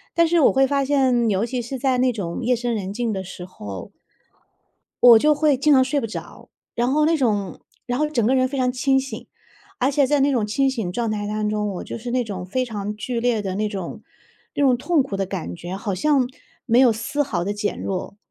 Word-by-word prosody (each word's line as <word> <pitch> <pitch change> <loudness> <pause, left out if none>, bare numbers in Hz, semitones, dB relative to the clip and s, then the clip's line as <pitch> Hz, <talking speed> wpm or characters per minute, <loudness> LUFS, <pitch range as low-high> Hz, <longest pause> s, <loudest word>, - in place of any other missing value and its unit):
但 335 0 +5
是 340 0 +3
我 - - +5
会 270 0 +4
发 280 -1 0
现， 260 -5 +2
尤 200 +3 +1
其 245 0 -3
是 260 +3 -5
在 260 -1 +1
那 255 0 +3
种 195 +1 -4
夜 250 +1 +2
深 240 0 -2
人 195 -1 -4
静 235 0 -1
的 190 - -3
时 180 -1 -9
候 100 - -9 1.1
我 235 -2 +9
就 300 +4 +4
会 295 -2 +2
经 290 +2 +4
常 260 - +6
睡 285 +2 0
不 225 - -3
着， 220 - -9 0.3
然 240 +2 +1
后 300 +1 +3
那 330 0 +3
种 205 - -1 0.3
然 245 +1 -1
后 305 0 +1
整 240 -7 0
个 260 +4 +3
人 255 0 +3
非 275 - -5
常 250 -1 +1
清 265 +1 +2
醒。 270 - -7 0.5
而 260 +3 +3
且 280 -1 +3
在 290 +1 +2
那 280 +1 +3
种 230 -6 +1
清 270 +5 +1
醒 220 -9 -3
状 230 +1 -1
态 205 -1 -2
当 210 0 -2
中， 210 -1 -1
我 185 - -5
就 - - -6
是 240 +2 -6
那 250 -1 +1
种 190 -5 -6
非 255 +7 -1
常 210 -3 -5
剧 230 +3 -3
烈 235 -3 +1
的 190 -1 -3
那 210 0 0
种 190 -4 -6 0.5
那 285 - 0
种 255 -3 +4
痛 310 +2 +2
苦 205 -7 -5
的 195 -1 -1
感 85 - -5
觉， 175 +2 -6
好 200 -1 -3
像 270 +7 +2 0.4
没 235 0 +4
有 255 -3 +6
丝 230 +6 -4
毫 220 -12 0
的 200 +3 -2
减 205 0 -3
弱。 195 +1 -4
240 Hz, 260 characters per minute, -22 LUFS, 205-270 Hz, 1.1 s, 我